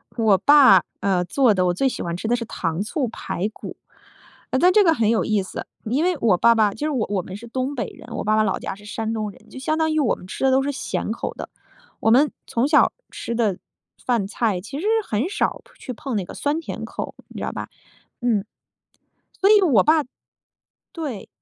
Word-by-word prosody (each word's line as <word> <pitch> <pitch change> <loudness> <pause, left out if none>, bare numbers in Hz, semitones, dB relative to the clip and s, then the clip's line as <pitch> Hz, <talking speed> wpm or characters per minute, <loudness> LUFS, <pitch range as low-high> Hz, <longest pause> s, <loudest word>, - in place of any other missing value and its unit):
我 220 -4 +4
爸， 260 -8 +7 0.2
呃， 190 -3 +1
做 250 +3 +3
的 185 -2 +1
我 175 - +2
最 270 +9 +1
喜 - - -5
欢 170 0 -3
吃 185 - -4
的 240 - +2
是 235 -1 -4
糖 170 -5 -3
醋 255 - -2
排 205 -3 -3
骨。 - - -9 0.8
呃， - - +2
但 360 +5 +5
这 420 0 +6
个 330 - +5
很 230 -8 +1
有 230 - +2
意 210 -2 +1
思， 190 - -7 0.2
因 255 +8 0
为 360 0 +2
我 205 -6 +4
爸 235 +4 +5
爸 210 -2 +3
就 300 - -3
是 - - -1
我 250 -7 0
我 200 -2 0
们 185 +2 -9
是 230 +4 -10
东 260 +4 -3
北 245 - -2
人， - - -13
我 - - -3
爸 215 +1 +2
爸 215 - +4
老 195 -3 0
家 - - -4
是 205 +1 -16
山 220 +1 -3
东 215 -2 -2
人。 215 +2 -20
就 260 - -9
相 310 +4 -1
当 320 0 +1
于 310 - +1
我 270 -6 +2
们 - - -13
吃 265 - -3
的 265 - +4
都 265 +1 +3
是 285 - -1
咸 280 - -3
口 - - -4
的， - - -7 0.5
我 - - +2
们 280 +5 +5 0.2
从 240 +3 +1
小 300 0 +4 0.2
吃 235 - -5
的 215 -6 +1 0.5
饭 235 -5 +1
菜 205 -3 -1
其 275 +9 -7
实 385 - -2 0.2
很 230 - -1
少 415 - -1 0.2
去 - - -7
碰 245 +1 -5
那 200 - 0
个 - - -10
酸 290 +2 -1
甜 - - -6
口， - - -6 0.2
你 - - -8
知 - - -4
道 - - -3
吧。 - - -6 0.5
嗯。 230 -5 +1 1.0
所 390 - +5
以 425 -1 +7
我 260 - +5
爸 310 -1 +3 0.9
对。 290 - -5
235 Hz, 250 characters per minute, -22 LUFS, 205-285 Hz, 1.0 s, 爸